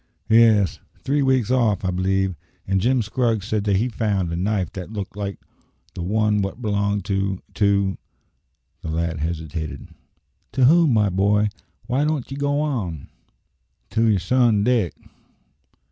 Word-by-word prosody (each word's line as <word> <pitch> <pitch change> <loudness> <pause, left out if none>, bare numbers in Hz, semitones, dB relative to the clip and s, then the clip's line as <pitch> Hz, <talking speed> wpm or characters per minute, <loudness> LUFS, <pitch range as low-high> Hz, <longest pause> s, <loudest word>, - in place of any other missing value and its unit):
"Yes; 110 -5 +4 0.2
three 145 +2 +1
weeks 130 -4 +2
off, 110 -7 +2
I 90 - +1
believe. 95 +1 0 0.3
And 95 0 0
Jim 125 +2 +2
Scraggs 110 -2 0
said 105 -1 -1
that 100 -2 +2
he 110 +6 +1
found 100 -7 -1
a - - -1
knife 95 +1 -1
that 95 +2 -7
looked 100 -3 -6
like 100 -1 -4 0.6
the - - -6
one 105 +3 +1
wot 100 +4 -4
belonged 100 -3 -1
to 95 -2 -1
to 100 -2 +1 0.4
" - - -49
the 80 - -6
lad 80 0 -2
hesitated. 80 -1 -4 0.6
"To 130 -1 +3
whom, 165 +1 +5
my 105 -2 +3
boy? 100 +3 +2 0.4
Why 130 +4 0
don't 150 -4 -1
ye - - -4
go 145 +1 0
on?" 105 - -3 0.8
"To 115 +1 +2
your 105 - +3
son 115 +2 +2
Dick." 115 -7 +1
105 Hz, 155 wpm, -22 LUFS, 95-120 Hz, 0.8 s, whom